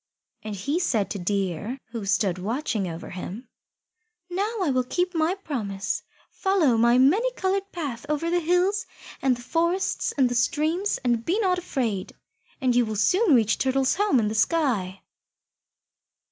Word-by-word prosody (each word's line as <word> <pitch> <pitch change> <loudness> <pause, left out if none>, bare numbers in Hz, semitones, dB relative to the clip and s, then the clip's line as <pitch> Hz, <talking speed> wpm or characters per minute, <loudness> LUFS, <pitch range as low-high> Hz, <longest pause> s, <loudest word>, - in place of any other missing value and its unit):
And 215 -1 -5
he 280 - -1
said 230 - 0
to 200 - -3
Deer, 195 - -2
who 225 -4 -5
stood 195 -3 +1
watching 220 0 -2
him, 180 +6 -7 0.8
"Now 400 +5 -1
I 310 - +1
will 255 -1 +2
keep 355 +8 -1
my 330 +2 +1
promise. 210 - -3 0.3
Follow 370 -11 +2
my 235 +2 +4
many 375 - +4
coloured 395 -2 -1
path 280 -9 -5
over 300 +3 0
the 350 - +3
hills 360 +5 +1 0.3
and 260 -2 +2
the 240 - -11
forests 340 +7 0
and 265 -2 +4
the 245 - -2
streams, 315 +10 +1
and 240 -2 +1
be 355 - 0
not 365 -3 +2
afraid, 235 - -2 0.5
and 255 -4 +1
you 245 - +5
will 220 -1 -3
soon 350 - +4
reach 225 -3 +2
Turtle's 265 0 +2
home 405 -8 +2
in 215 - +1
the 215 - -2
sky." 220 - 0
260 Hz, 160 wpm, -25 LUFS, 215-350 Hz, 0.8 s, you